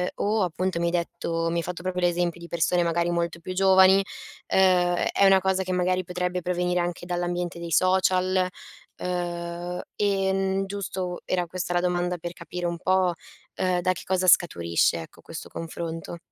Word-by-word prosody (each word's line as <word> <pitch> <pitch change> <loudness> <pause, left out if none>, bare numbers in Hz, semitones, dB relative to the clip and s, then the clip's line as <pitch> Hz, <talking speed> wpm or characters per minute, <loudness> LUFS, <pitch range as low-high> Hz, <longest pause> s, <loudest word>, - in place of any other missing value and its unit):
o, 210 0 +1
appunto, 180 0 -1
mi 170 - 0
hai - - 0
detto 165 -1 -2
mi 170 - -1
hai 170 - 0
fatto 180 0 -6
proprio 180 -1 -2
l'esempio 175 -1 +1
di 170 - -9
persone 170 +1 +1
magari 170 +1 +1
molto 170 0 -1
più 185 +2 -6
giovani, 190 0 +6
uhm, 195 - -6 0.5
è - - 0
è 200 - +3
una 195 0 +6
cosa 190 0 +1
che 185 - -4
magari 185 0 +1
potrebbe 180 0 -2
provenire 180 0 0
anche 175 0 -4
dall'ambiente 175 0 -2
dei 170 -1 -6
social? 185 +1 +3 0.5
Uhm, 175 0 -4
en 195 -1 +1
giusto 190 -2 -4
era 180 -2 0
questa 175 0 -3
la 175 - +3
domanda 180 0 0
per 175 +1 -6
capire 175 0 -5
un 170 0 -3
po', 185 -1 +2 0.4
ehm, 180 -1 0
da 185 - +2
che - - -9
cosa 185 0 0
scaturisce, 85 - +3
ecco, - - -13
questo - - -8
confronto? 165 0 -6
180 Hz, 175 wpm, -25 LUFS, 170-185 Hz, 0.5 s, giovani